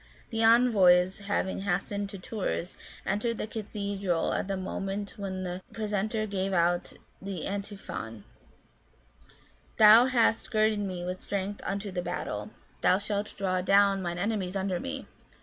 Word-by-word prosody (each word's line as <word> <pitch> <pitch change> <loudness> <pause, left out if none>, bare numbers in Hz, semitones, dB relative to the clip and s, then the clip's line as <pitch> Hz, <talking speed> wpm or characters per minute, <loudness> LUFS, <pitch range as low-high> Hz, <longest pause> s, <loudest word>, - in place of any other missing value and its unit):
The 225 0 0
envoys 195 -6 +5
having 190 -2 0
hastened 200 +1 -2
to 200 - -7
Tours, 185 -2 -3 0.3
entered 215 +4 -1
the - - -2
cathedral 200 -5 -2
at - - -1
the 195 -1 -2
moment 195 +2 -4
when 190 -2 -4
the 180 0 -4
Precentor 215 0 -1
gave 195 -1 -2
out 175 0 +1 0.3
the 190 -3 -5
Antiphon: 195 - -5 0.8
" - - -29
Thou 220 +3 +9
hast 235 -3 +2
girded 215 -2 +2
me 185 -3 -3
with 180 +1 -4
strength 200 0 -3
unto 200 +1 -3
the 180 -1 -2
battle: 105 -12 -4 0.3
thou 185 - +4
shalt 205 0 -2
throw 185 -2 -1
down 195 +1 +4
mine 175 -1 -3
enemies 200 -1 -1
under 190 -2 -1
me. 85 - -5
195 Hz, 145 wpm, -29 LUFS, 180-210 Hz, 0.8 s, Thou